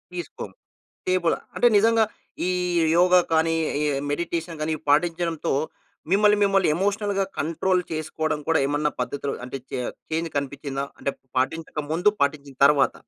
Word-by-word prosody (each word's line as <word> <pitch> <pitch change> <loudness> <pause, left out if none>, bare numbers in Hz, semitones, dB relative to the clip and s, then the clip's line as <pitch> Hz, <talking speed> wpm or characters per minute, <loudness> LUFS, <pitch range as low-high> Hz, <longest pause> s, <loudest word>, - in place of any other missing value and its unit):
తీసుకోము. 175 -4 -6 0.5
డీప్‌గా 185 -2 +2 0.2
అంటే 245 - +4
నిజంగా 225 +2 +4 0.4
ఈ - - +1 0.5
యోగ 180 +1 +4 0.2
కానీ, 165 0 +3 0.3
ఈ - - +1 0.3
మెడిటేషన్ 170 +1 -3
గాని 155 +1 0
పాటించడంతో 165 +1 +1 0.6
మిమ్మల్ని, 210 +1 +5
మిమ్మల్ని 195 -3 +3
ఎమోషనల్‌గా 200 +1 0
కంట్రోల్ 180 +4 +1
చేసుకోవడం 155 -1 -2
కూడా 165 - +3
ఏమన్నా 145 +1 0
పద్ధతిలో 140 +3 -3
అంటే 125 +2 -5
చే - - -2 0.3
చేంజ్ 165 +1 -1
కనిపిచ్చిందా? 140 0 -3
అంటే 140 - -1 0.3
పాటించక 155 +4 -2
ముందు, 175 +6 +3
పాటించిన 140 -1 -1
తర్వాత. 145 -1 +4
165 Hz, 130 wpm, -24 LUFS, 145-185 Hz, 0.6 s, మిమ్మల్ని